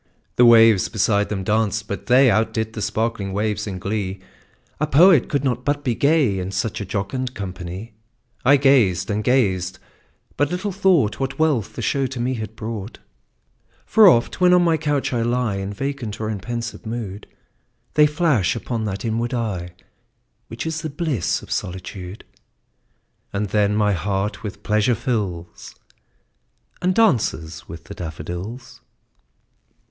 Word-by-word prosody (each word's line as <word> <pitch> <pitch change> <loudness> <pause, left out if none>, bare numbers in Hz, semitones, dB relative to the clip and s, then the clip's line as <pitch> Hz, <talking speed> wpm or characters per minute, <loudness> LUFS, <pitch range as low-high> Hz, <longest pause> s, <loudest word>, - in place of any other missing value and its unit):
The 120 - +6
waves 115 -4 +6
beside 105 -1 +1
them 100 -2 -3
danced; 110 0 0
but 100 - -6
they 125 0 +6
Outdid 110 0 0
the 105 - -5
sparkling 105 -2 -2
waves 105 +1 -1
in 95 -2 -4
glee; 100 0 -3 0.6
A 150 - +1
poet 160 -1 +5
could 140 -2 0
not 125 -2 -1
but 145 +1 -1
be 125 - +1
gay, 140 -7 +2
In 90 0 -4
such 110 +1 -2
a - - -4
jocund 125 +7 -3
company; 95 +2 -7 0.5
I 140 +3 +6
gazed 130 -10 +3
and 105 +1 -1
gazed 95 -7 +1 0.6
but 145 0 +2
little 185 +4 -2
thought 180 - +2
What 135 0 -3
wealth 150 -9 +2
to - - -15
me - - -24
the - - -5
show 135 +4 +1 0.3
had 110 0 -6
brought: 110 -1 -6 0.9
For 220 -2 +6
oft, 120 +2 +3
when 180 0 +6
on 180 - +4
my 165 -2 +3
couch 145 -4 -1
I 120 - 0
lie 120 -3 0
In 95 +1 -4
vacant 120 -1 -4
or 110 0 -2
in 105 - -4
pensive 120 +2 -5
mood, 110 -3 -6 0.7
They 150 0 +6
flash 145 - +1
upon 115 -1 -3
that 100 +1 -4
inward 115 +2 -1
eye 100 -7 -3 0.8
Which 115 - -6
is 160 0 -3
the 155 - -4
bliss 145 - -1
of - - -12
solitude; 90 +2 -5 1.1
And 100 0 -2
then 105 0 +2
my 105 -1 +2
heart 100 +3 -2
with 105 -1 -7
pleasure 105 +3 +2
fills, 105 -8 -4 1.1
And 185 +1 +1
dances 105 - +1
with 80 -1 -9
the - - -10
daffodils. 90 +9 -7
110 Hz, 155 wpm, -21 LUFS, 100-135 Hz, 1.1 s, The